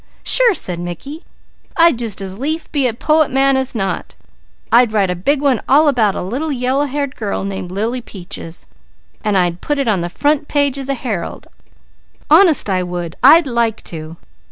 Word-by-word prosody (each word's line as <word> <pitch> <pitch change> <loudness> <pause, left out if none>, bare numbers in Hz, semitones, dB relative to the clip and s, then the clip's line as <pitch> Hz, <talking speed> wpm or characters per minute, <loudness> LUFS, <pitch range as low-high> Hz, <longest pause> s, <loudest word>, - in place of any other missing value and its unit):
"Sure!" 485 -5 +5
said 180 - -3
Mickey. 175 - -7 0.5
"I'd 335 -7 +4
just 220 -5 -3
as 190 +1 -7
lief 315 +5 -3
be 280 -4 +1
a 235 - -2
poet 310 +4 +2
man 270 +1 +2
as 265 -1 -2
not! 195 -3 -3 0.6
I'd 235 -1 +5
write 195 -4 +1
a - - -2
big 275 +11 0
one 270 -6 +1
all 295 +4 +5
about 225 -8 +2
a - - -3
little 265 - -3
yellow 260 +2 0
haired 280 -1 -3
girl 205 -4 -3
named 195 -2 -5
Lily 225 +7 -2
Peaches, 180 -5 -9 0.6
and 210 -3 +1
I'd 175 -1 0
put 295 - -2
it 275 -3 -1
on 200 -5 +1
the 175 - -3
front 290 - 0
page 285 -2 0
of 270 - -6
the 275 - -1
Herald! 255 0 -5 0.9
Honest 325 - +5
I 185 -2 0
would! 175 -2 -5
I'd 315 +6 +7
like 235 -3 -1
to!" 160 +1 -8
245 Hz, 185 wpm, -17 LUFS, 190-285 Hz, 0.9 s, I'd